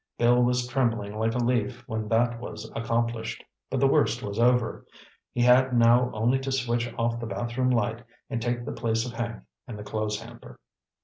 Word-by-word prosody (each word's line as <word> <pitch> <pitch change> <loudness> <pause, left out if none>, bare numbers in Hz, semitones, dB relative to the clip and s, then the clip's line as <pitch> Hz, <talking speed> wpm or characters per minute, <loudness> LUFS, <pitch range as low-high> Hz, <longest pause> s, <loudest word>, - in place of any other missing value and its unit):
Bill 120 +1 +4
was 125 0 +2
trembling 115 -5 -1
like 115 0 0
a - - +1
leaf 120 0 0
when 110 -4 -3
that 115 +1 +1
was 110 -2 -8
accomplished. 115 0 -2 0.3
But 135 - -1
the 135 - +4
worst 135 -4 +2
was 100 +2 -4
over. 125 -1 +2 0.5
He 120 - -1
had 125 +1 +5
now 120 +2 +5
only 120 +5 +1
to 135 0 -4
switch 120 -2 0
off 115 0 0
the 120 - -5
bathroom 120 +5 -1
light 115 -1 0 0.2
and 115 - -3
take 120 0 -2
the - - -4
place 115 -1 -1
of 125 - -5
Hank 115 0 -4 0.2
in 120 - -6
the 105 - -7
clothes 105 0 -2
hamper. - - -12
120 Hz, 190 wpm, -27 LUFS, 115-125 Hz, 0.5 s, had